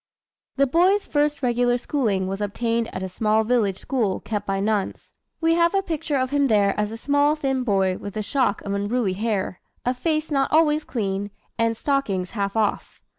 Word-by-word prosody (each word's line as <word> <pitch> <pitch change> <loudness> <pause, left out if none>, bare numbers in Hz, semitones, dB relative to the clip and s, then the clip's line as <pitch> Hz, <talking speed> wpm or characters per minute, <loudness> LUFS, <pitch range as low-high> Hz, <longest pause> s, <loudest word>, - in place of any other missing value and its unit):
The 275 - +4
boy's 360 +9 +3
first 295 -1 0
regular 245 0 +2
schooling 225 -8 0
was 195 +2 -4
obtained 230 +3 -1
at 185 - -5
a - - -2
small 215 +4 +1
village 215 -5 +1
school 220 -8 -1
kept 210 -2 -4
by 195 0 0
nuns. 205 0 -2 0.3
We 330 0 +3
have 340 +2 +3
a 390 - +2
picture 315 -4 -2
of 260 0 -1
him 285 -1 +3
there 205 -4 +3
as 210 0 -1
a 225 - -6
small 285 +4 +2
thin 270 -4 -1
boy 195 -5 +1
with 205 +1 -7
a 215 - -1
shock 265 +5 0
of 200 - -3
unruly 205 0 0
hair, 205 -2 -2 0.2
a 250 - +2
face 310 +4 -1
not 275 -2 +1
always 305 -1 +3
clean, 200 -3 -2 0.3
and 230 0 +1
"stockings 215 -10 -1
half 200 -2 -2
off." 215 -2 -1
230 Hz, 190 wpm, -23 LUFS, 200-285 Hz, 0.3 s, The